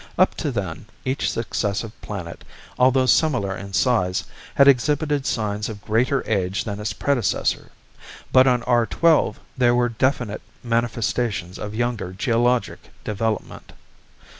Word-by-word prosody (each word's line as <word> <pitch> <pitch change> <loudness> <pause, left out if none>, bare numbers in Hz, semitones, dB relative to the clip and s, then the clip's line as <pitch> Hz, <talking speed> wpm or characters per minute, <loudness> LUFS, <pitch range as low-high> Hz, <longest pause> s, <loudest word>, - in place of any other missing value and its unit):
Up - - +4
to - - -2
then, - - -4 0.2
each 130 +2 0
successive 105 -1 -2
planet, 90 -5 -7 0.4
although 130 +1 +4
similar 125 -9 +2
in 100 +1 -8
size, 90 -2 +1 0.3
had 140 - +6
exhibited 145 +1 +2
signs 105 -2 -2
of 105 -2 -8
greater 125 +5 +1
age 95 -2 0
than 105 -2 -5
its 105 0 -2
predecessor. 130 -9 0 0.6
But 130 0 +6
on 125 -2 +2
R 120 -2 +2
12 165 -2 +2 0.2
there 120 -2 +3
were 120 0 +2
definite 120 -2 -1 0.2
manifestations 115 -5 -1
of 105 0 -6
younger 115 -5 -2
geologic 120 +1 +1 0.2
development. 110 +1 -3
115 Hz, 130 wpm, -22 LUFS, 105-130 Hz, 0.6 s, had